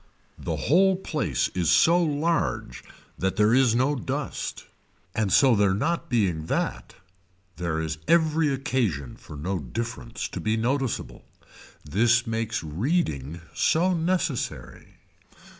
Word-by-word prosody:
The - - -3
whole 190 +7 +3
place 170 -5 -1
is 85 -4 -1
so 165 - +5
large 160 +1 -1 0.4
that 95 0 0
there 105 +2 +3
is 125 -3 +4
no 130 +4 +2
dust 140 +2 -4 0.5
and 105 -3 0
so 130 +1 +5
there 100 -2 +3
not 165 - -1
being 90 -10 0
that - - -2 0.6
there 85 -2 -2
is 80 -1 -3
every 160 -2 +3
occasion 120 - -1
for 75 - -12
no 90 +5 -2
difference 115 - -5
to - - -6
be 110 +1 0
noticeable. 130 +2 -2 0.6
This 115 +9 +3
makes 115 -2 -2
reading 80 - -2
so 175 +3 +2
necessary. 165 -7 -2
115 Hz, 125 wpm, -25 LUFS, 90-150 Hz, 0.6 s, so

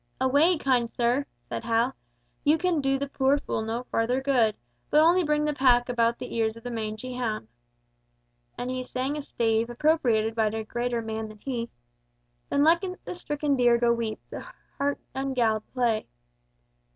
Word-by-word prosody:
"Away, 285 +7 +4
kind 250 -5 +1
sir," 245 +5 0 0.2
said 115 -1 -4
Hal, 230 +3 +1 0.5
"you 300 +2 +4
can 345 -3 +1
do 270 0 +1
the 280 - -2
poor 275 +1 +2
fool 280 - -3
no 225 +2 -3
further 235 +3 +1
good! 250 -6 +2 0.3
but 300 - +5
only 345 +4 +5
bring 300 -1 +1
the 300 - 0
pack 250 -3 +3
about 235 -1 +2
the - - -7
ears 225 -1 0
of 230 - -13
the 245 - -5
mangy 220 +2 -4
hound." 225 - -3 1.1
And 245 +1 -3
he 255 0 -2
sang 255 +3 -3
a 300 - -3
stave 225 -3 0
appropriated 240 -5 +2
by 220 -1 +2
a 220 +1 -2
greater 240 +1 -2
man 220 0 -4
than 215 0 -12
he— 235 0 -4 0.8
"Then 285 - +2
let 335 +4 +4 0.2
the - - -4
stricken 295 -4 -1
deer 240 -2 +4
go 235 0 +3
weep, 230 -2 -3
The - - -6 0.4
hart 280 0 +1 0.2
ungalled 245 -5 0
play." 235 -4 0
245 Hz, 175 wpm, -27 LUFS, 225-280 Hz, 1.1 s, but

